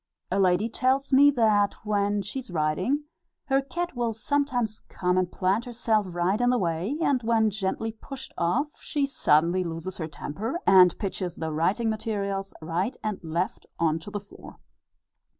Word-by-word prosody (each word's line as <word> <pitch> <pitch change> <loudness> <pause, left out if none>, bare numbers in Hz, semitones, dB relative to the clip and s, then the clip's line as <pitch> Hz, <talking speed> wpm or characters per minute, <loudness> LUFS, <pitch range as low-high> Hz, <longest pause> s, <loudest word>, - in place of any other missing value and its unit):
A 195 - +1
lady 185 +3 +3
tells 260 +4 0
me 280 +2 +8
that 215 -6 +3
when 205 -1 +1
she 265 - -5
is 255 - -9
writing, 175 - 0 0.4
her 270 -1 +2
cat 345 +4 -4
will 235 -2 0
sometimes 245 -3 0
come 180 0 0
and 185 -1 +1
plant 195 +5 0
herself 220 -6 0
right 185 +6 +1
in 245 - +3
the 250 - +3
way, 180 - -1
and 265 -3 +2
when 225 -2 +2
gently 210 +2 -2
pushed 260 +4 -10
off, 255 - -1
she 290 -2 -1
suddenly 170 - +2
loses 170 +2 -5
her 160 - -2
temper, 210 - -4
and 185 -2 +7
pitches 185 -4 -3
the 160 -1 -3
writing 190 +9 +1
materials 200 -3 -3
right 170 +8 -1
and 215 -2 -2
left 170 +7 -3
on 160 -1 +1
to 165 - -10
the 205 0 -4
floor. 200 - -14
205 Hz, 170 wpm, -26 LUFS, 180-245 Hz, 0.4 s, me